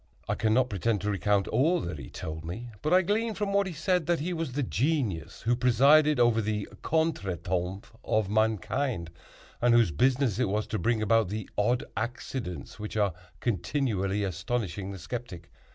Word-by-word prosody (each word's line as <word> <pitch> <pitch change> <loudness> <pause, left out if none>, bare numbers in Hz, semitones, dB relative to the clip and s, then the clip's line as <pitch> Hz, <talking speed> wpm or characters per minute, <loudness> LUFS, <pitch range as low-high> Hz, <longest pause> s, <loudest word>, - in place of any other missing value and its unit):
I - - +1
cannot 120 +3 +2
pretend 105 +2 0
to 105 - 0
recount 100 0 +1
all 165 +7 +3
that 85 -4 -5
he 65 - -8
told 80 0 -6
me, 115 +9 -6
but 155 - -1
I 185 +1 +6
gleaned 215 +4 0
from 205 -2 -1
what 200 -1 +3
he 180 - -5
said 165 +1 0
that 175 -1 +2
he 175 +5 -2
was 160 -6 -3
the 145 +2 0
genius 120 - -1
who 120 +2 +2
presided 140 +4 +5
over 120 -2 +4
the 105 -1 -2
contretemps 95 - -1
of 110 -2 +1
mankind, 110 -1 0 0.5
and 120 0 +5
whose 115 -7 +4
business 125 - +2
it 125 -6 +2
was 105 +2 0
to 110 - -1
bring 115 -2 +1
about 115 -2 +3
the 105 0 -4
odd 120 +4 +2
accidents 110 - -5
which 105 +1 -5
are 100 -4 +2 0.3
continually 105 - 0
astonishing 95 +1 -3
the 100 - -7
skeptic. 95 -4 -7
115 Hz, 175 wpm, -28 LUFS, 100-135 Hz, 0.5 s, I